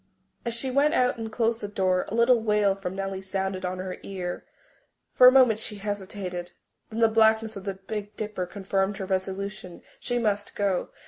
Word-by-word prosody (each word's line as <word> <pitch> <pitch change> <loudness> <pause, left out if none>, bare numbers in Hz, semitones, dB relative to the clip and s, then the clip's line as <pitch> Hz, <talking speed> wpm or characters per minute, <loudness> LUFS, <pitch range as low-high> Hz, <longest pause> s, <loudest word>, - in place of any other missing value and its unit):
As 235 -1 -2
she 255 +3 -2
went 285 +3 +3
out 250 -1 +2
and 225 -1 -5
closed 230 +1 0
the 205 - -3
door, 185 -2 +1
a 210 - -4
little 235 0 +4
wail 210 -2 +3
from 190 -1 -5
Nellie 195 -1 -3
sounded 190 0 -3
on 185 0 -2
her 185 0 -5
ear. 180 -2 -5 0.7
For 250 - +8
a - - +10
moment 250 -5 +5
she 220 -1 -3
hesitated, 195 -3 -5 0.4
then 225 +1 -4
the 225 - +7
blackness 220 0 +3
of 195 -1 -8
the 195 -1 -3
Big 205 +2 -6
Dipper 210 -4 -3
confirmed 195 +1 -1
her 195 - -4
resolution. 190 0 -4 0.2
She 245 - -2
must 205 -3 -1
go. 195 -3 0
205 Hz, 190 wpm, -26 LUFS, 190-225 Hz, 0.7 s, a